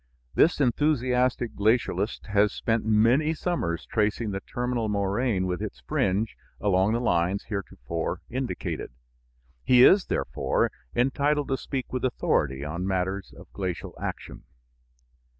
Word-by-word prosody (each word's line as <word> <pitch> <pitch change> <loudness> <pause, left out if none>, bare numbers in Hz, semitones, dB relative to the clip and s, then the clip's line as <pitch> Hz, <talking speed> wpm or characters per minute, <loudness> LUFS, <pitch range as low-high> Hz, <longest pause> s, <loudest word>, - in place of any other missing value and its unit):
This 165 - +4
enthusiastic 125 -3 +1
glacialist 110 -1 +1
has 105 0 +3
spent 115 -1 -1
many 120 +9 +3
summers 90 - -2
tracing 105 0 0
the 95 - -3
terminal 120 +1 -2
moraine 100 0 0
with 90 -2 -2
its 65 - -6
fringe 100 - 0 0.2
along 100 +1 +2
the 115 - +1
lines 90 -3 +1
heretofore 85 - -4
indicated. 120 - -4 0.7
He 125 -1 +6
is, 190 +6 +7
therefore, 65 - 0 0.2
entitled 140 +3 +1
to 135 - +1
speak 130 -2 -5
with 130 - -2
authority 70 - 0
on 85 +5 -3
matters 95 +1 -2
of - - -15
glacial 95 -3 -4
action. - - -5
110 Hz, 125 wpm, -26 LUFS, 95-125 Hz, 0.7 s, is